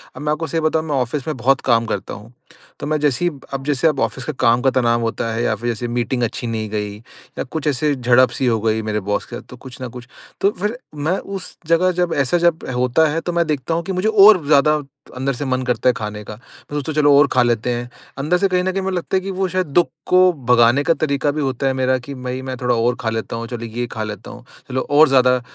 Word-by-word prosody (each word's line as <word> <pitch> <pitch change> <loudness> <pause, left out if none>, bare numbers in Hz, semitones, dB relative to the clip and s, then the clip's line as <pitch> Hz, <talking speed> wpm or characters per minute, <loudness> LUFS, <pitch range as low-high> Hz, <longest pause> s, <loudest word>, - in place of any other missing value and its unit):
अब - - -8
मैं 150 0 -1
आपको 155 +2 -2
सही 165 +3 -1
बताऊँ 155 0 +1
मैं 150 -2 -2
ऑफिस 130 +2 -2
में 155 - -2
बहुत 135 +3 +2
काम 115 -2 +2
करता 100 -4 -4
हूँ। 110 +4 -11 0.5
तो - - -5
मैं 155 +1 +1
जैसे 145 +3 +1
ही 175 - +2 0.2
अब 135 0 -3
जैसे 145 +2 +2
अब 150 -4 0
ऑफिस 115 +3 -2
का 155 - -3
काम 120 -1 +3
का 135 - +3
तनाव 120 -2 +2
होता 115 0 -2
है 115 +1 -1
या 110 - +1
फिर 120 +3 -4
जैसे 120 +1 -3
मीटिंग 120 +1 -1
अच्छी 120 +1 -3
नहीं 110 -2 -3
गई 105 -1 -3
या 115 - -10
कुछ 155 +3 -5
ऐसे 150 +1 +1
झड़प-सी 125 0 +3
हो 115 -3 +2
गई 110 0 +1
मेरे 105 -1 -2
बॉस 105 - 0
के 120 - -9
साथ - - -8
तो 125 - -11
कुछ 125 0 -11
न 130 - -3
कुछ। 120 0 -11 0.3
तो 200 - +3
फिर 210 +5 -2 0.2
मैं 155 +6 -1
उस 195 -2 -8
जगह 170 +3 +3
जब 175 -1 0
ऐसा 140 +5 +2
जब 170 -1 +1
होता 125 +6 +3
है 160 +2 -1
तो 175 - -3
मैं 170 0 +2
देखता 150 +1 -2
हूँ 170 +1 -1
कि 190 - -4
मुझे 185 +3 0
और 205 -5 +7
ज़्यादा 150 0 +5 0.4
अंदर 135 +2 -1
से 140 +3 -5
मन 130 -1 -1
करता 125 0 +1
है - - +3
खाने 105 -2 -6
का। 105 - -8
मैं 145 +4 -10
सोचता 145 +2 -3
चलो 145 -1 +4
और 145 - +5
खा 130 - +3
लेते 120 0 0
हैं। 120 0 -4 0.3
अंदर 150 +6 +1
से 195 +2 +2
कहीं 180 -1 +1
न 185 - 0
कहीं 195 +1 -2
मुझे 190 0 -2
लगता 175 +2 -1
है - - -1
कि 195 +1 -5
वो 190 0 -1
शायद 185 +1 -1
दुःख 165 +4 +3 0.2
को 180 0 +5 0.3
भगाने 120 +3 +5
का 165 - +3
तरीका 145 -2 0
भी 150 +1 -3
होता 135 -1 -1
है 135 - +1
मेरा 130 0 +1
कि 140 - -7
भई 125 0 -5
मैं 130 0 -5
थोड़ा 125 -1 0
और 120 +1 +1
खा 115 - -1
लेता 110 0 -4
हूँ, 115 0 -5
चलो 120 -1 -6
ये 120 +2 -3
खा 110 - -4
लेता 105 -2 -7
हूँ, - - -12 0.3
चलो 130 0 -1
और 150 +2 +6
ज़्यादा 125 -1 +4
130 Hz, 270 wpm, -19 LUFS, 120-160 Hz, 0.5 s, और